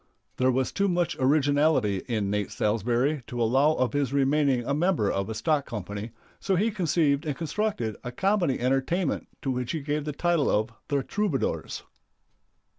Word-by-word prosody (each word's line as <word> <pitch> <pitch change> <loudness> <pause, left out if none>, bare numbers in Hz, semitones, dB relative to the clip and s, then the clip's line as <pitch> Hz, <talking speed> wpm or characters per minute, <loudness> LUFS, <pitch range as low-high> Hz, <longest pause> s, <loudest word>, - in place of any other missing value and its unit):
There 130 0 +3
was 130 0 +1
too 200 0 +1
much 175 -2 0
originality 140 -6 +2
in 105 -5 -1
Nate 105 -1 -1
Salsbury 120 +7 0
to 120 - -5
allow 135 +7 +3
of 130 -3 0
his 145 -2 0
remaining 140 -2 +2
a 140 - 0
member 155 - +1
of 100 +1 -2
a 110 - -4
stock 150 +4 0
company, 105 +1 -5 0.3
so 195 - 0
he 215 +5 +1
conceived 160 -7 +1
and 150 -4 -2
constructed 160 - -2
a 125 - -5
comedy 190 -1 +1
entertainment 135 +7 0 0.2
to 135 - 0
which 125 -1 -2
he 160 - -1
gave 145 +1 -2
the 150 - -2
title 170 0 +1
of 110 +2 +1 0.2
"The 140 -2 0
Troubadours." 200 -7 -2
140 Hz, 170 wpm, -27 LUFS, 120-160 Hz, 0.3 s, There